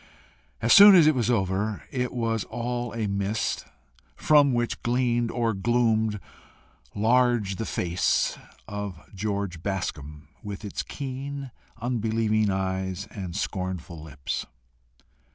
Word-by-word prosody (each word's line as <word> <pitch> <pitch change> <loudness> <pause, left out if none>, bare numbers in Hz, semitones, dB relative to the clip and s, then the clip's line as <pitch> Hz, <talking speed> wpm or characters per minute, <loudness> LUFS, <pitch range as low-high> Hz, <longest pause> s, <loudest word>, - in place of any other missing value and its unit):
As - - +5
soon 205 -1 +10
as 170 -4 +7
it 155 - +5
was 120 -4 0
over, 100 -1 0
it 125 -1 -1
was 115 -3 -1
all 120 0 -3
a 115 -2 -1
mist 100 +2 -1 0.5
from 145 -2 +4
which 120 -1 -1
gleamed 120 -1 +1
or 115 -2 0
gloomed 110 0 +1 0.8
large 115 -3 +2
the 115 - -3
face 85 0 0 0.3
of 100 -4 -5
George 100 -3 -3
Bascombe 75 -6 -4
with 100 +1 -7
its 100 - -3
keen 140 0 -6 0.3
unbelieving 110 -2 0
eyes 95 0 -2
and 95 -4 -6
scornful 95 -5 -4
lips. 70 -3 -5
110 Hz, 115 wpm, -26 LUFS, 95-120 Hz, 0.8 s, soon